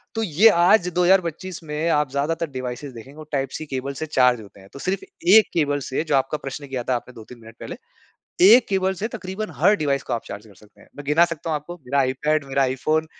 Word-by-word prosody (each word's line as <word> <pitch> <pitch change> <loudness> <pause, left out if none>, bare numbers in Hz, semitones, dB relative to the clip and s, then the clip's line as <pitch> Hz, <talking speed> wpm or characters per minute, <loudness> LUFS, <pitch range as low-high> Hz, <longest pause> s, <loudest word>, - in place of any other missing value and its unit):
तो 225 - -1
ये 190 +3 +4
आज 180 0 +4
2025 180 0 +1
में 155 +1 -2
आप 150 -3 +1
ज़्यादातर 155 +4 -2
डिवाइसेज़ 130 +1 -6
देखेंगे 130 +5 -12
वो 155 - -9
टाइप-सी 135 +2 -3
केबल 135 -1 -4
से 155 - -3
चार्ज 125 -5 +2
होते 100 -1 -15
हैं। 95 0 -17
तो 140 - -10
सिर्फ़ 185 +5 -2 0.3
1 220 -2 +7
केबल 145 -3 +1
से 130 - -1
जो 150 -3 0
आपका 135 +3 0
प्रश्न 140 +1 -7
किया 130 -2 -4
था 130 - +2
आपने 125 +1 -6
2-3 115 +1 -13
मिनट 115 0 -14
पहले, - - -7 0.7
1 220 +7 +7
केबल 190 -1 +1
से 200 +4 -3
तकरीबन 215 -2 -6
हर 210 - +4
डिवाइस 140 -5 -1
को - - -6
आप 115 - -2
चार्ज 100 +2 -9
कर 105 - -17
सकते 105 +2 -22
हैं। - - -19
मैं 145 - -9
गिना 155 +4 +4
सकता 165 -1 -5
हूँ - - 0
आपको, 150 +4 -8
मेरा 140 -3 -3
आईपैड, 140 +3 0
मेरा 135 0 +1
iPhone 155 +5 0
150 Hz, 230 wpm, -22 LUFS, 130-170 Hz, 0.7 s, 1